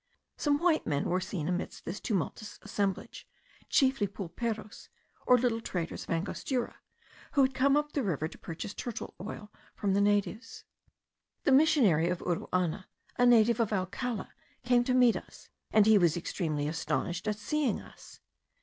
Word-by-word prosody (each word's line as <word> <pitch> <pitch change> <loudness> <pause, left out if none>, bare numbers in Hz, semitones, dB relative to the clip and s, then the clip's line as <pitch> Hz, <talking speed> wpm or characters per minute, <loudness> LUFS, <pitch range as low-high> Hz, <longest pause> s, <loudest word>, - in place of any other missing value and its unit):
Some 290 -1 +1
white 330 0 +2
men 145 -2 0
were 185 +1 0
seen 185 -5 -4
amidst 180 0 -3
this 185 +4 -4
tumultuous 210 +1 -3
assemblage, 200 -2 -3 0.4
chiefly 265 -7 +3
pulperos, 215 +3 -5 0.4
or 250 - +7
little 235 -2 0
traders 175 -6 -4
of - - -19
Angostura, 220 +9 -2 0.6
who 280 - +5
had 265 0 +2
come 275 +2 +3
up 295 0 -1
the 285 - -1
river 160 - -1
to - - -13
purchase 165 +4 -6
turtle 240 -3 -6
oil 210 +1 -7 0.2
from 200 -2 0
the 200 - +3
natives. 205 +3 0 0.8
The 285 - +3
missionary 250 - +4
of 180 - 0
Uruana, 180 +1 -1 0.3
a 245 - +6
native 235 -1 +5
of 225 -2 +1
Alcala, 205 +4 -3 0.3
came 245 0 +3
to 255 - +1
meet 250 -2 +5
us, - - -10 0.2
and 215 -2 +5
he 215 -1 +6
was 170 -3 +3
extremely 155 -4 -2
astonished 170 +4 -2
at 210 -1 0
seeing 290 0 0
us. - - -15
210 Hz, 160 wpm, -30 LUFS, 180-250 Hz, 0.8 s, or